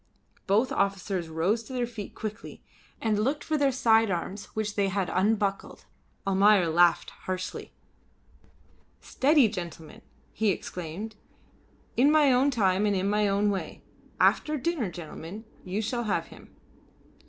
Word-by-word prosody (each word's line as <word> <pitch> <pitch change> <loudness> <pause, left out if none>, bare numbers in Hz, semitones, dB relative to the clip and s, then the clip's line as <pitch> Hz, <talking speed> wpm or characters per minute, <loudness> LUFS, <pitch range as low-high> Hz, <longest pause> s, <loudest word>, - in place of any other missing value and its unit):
Both 215 +6 +2
officers 195 -3 -1
rose 175 +8 0
to 260 - -9
their 245 -1 0
feet 225 -4 -8
quickly, 215 -1 -7 0.4
and 215 -2 0
looked 275 +7 0
for 315 - -1
their 285 -2 +2
side 225 -3 +3
arms 190 +3 -3
which 215 -1 -2
they 200 -1 +1
had 195 -1 -1
unbuckled. 200 0 0 0.4
Almayer 195 -2 +4
laughed 175 +1 +3 0.2
harshly. 185 0 -4 1.3
"Steady, 285 -2 +3
gentlemen!" 170 -6 -7 0.3
he 220 -1 +1
exclaimed. 185 +4 -5 0.8
"In 265 +4 +5
my 300 -3 +5
own 260 +3 +3
time 205 -5 +2
and 205 - +1
in 195 +2 0
my 210 0 +2
own 200 +1 +2
way. 195 - -5 0.4
After 305 0 +3
dinner, 275 - -1
gentlemen, 175 +4 -9 0.2
you 195 +4 -3
shall 240 +2 -2
have 205 - -1
him." - - -16
205 Hz, 140 wpm, -27 LUFS, 185-230 Hz, 1.3 s, In